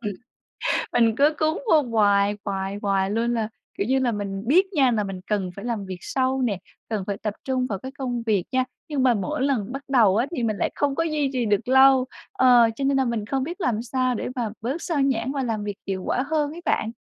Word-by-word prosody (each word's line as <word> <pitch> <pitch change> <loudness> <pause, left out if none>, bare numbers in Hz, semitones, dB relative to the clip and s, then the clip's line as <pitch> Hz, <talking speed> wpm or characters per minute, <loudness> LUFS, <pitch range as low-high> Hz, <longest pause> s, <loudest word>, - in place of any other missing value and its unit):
ừm. 210 -3 -3 0.8
Mình 230 -2 +3
cứ 295 +3 +4
cuốn 310 +1 +1
vô 310 -2 +6
hoài, 205 -4 +2
hoài, 195 0 -3
hoài 195 -1 +1
luôn. 235 +2 0
Là, 225 -2 -1 0.3
kiểu 200 - 0
như 265 +3 +2
là, 255 -3 +1
mình 200 -2 -4
biết 360 +9 +5
nha 275 -7 +4
là 215 -3 0
mình 195 -2 -6
cần 195 -3 0
phải 200 - -8
làm 225 -5 -3
việc 185 -1 -6
sâu 260 +3 0
nè, 210 -6 0 0.3
cần 215 -4 -2
phải 200 - -2
tập 210 -2 -2
trung 260 -1 0
vào 200 -5 -3
cái 260 +6 -8
công 245 -3 -2
việc 205 -5 +2
nha, 255 0 +2 0.2
nhưng 290 -4 -1
mà 255 -2 +4
mỗi 200 +4 -2
lần 250 -6 0
bắt 275 +1 -5
đầu 225 -8 +4
á, 235 +4 +2
thì 245 - -1
mình 215 -2 0
lại - - 0
không 285 -1 0
có 330 - 0
duy 300 -4 0
trì 250 -3 0
được 205 +2 0
lâu. 265 0 +6 0.3
Ờ, 245 -3 +5
cho 275 - -3
nên 275 0 +2
nà 265 - +3
mình 230 -4 -2
không 265 +3 -1
biết 345 +7 -6
làm 230 -8 0
sao 255 +1 0
để - - -3
mà 235 -4 -1
bớt 265 +9 -3
xao 320 -5 -1
nhãng 265 -2 +1
và 275 -2 -2
làm 220 -4 -2
việc 205 -1 -4
hiệu 190 -1 -3
quả 255 - +1
hơn 300 -1 0
ấy 340 - -8
bạn. 220 - 0
240 Hz, 250 wpm, -24 LUFS, 205-270 Hz, 0.8 s, vô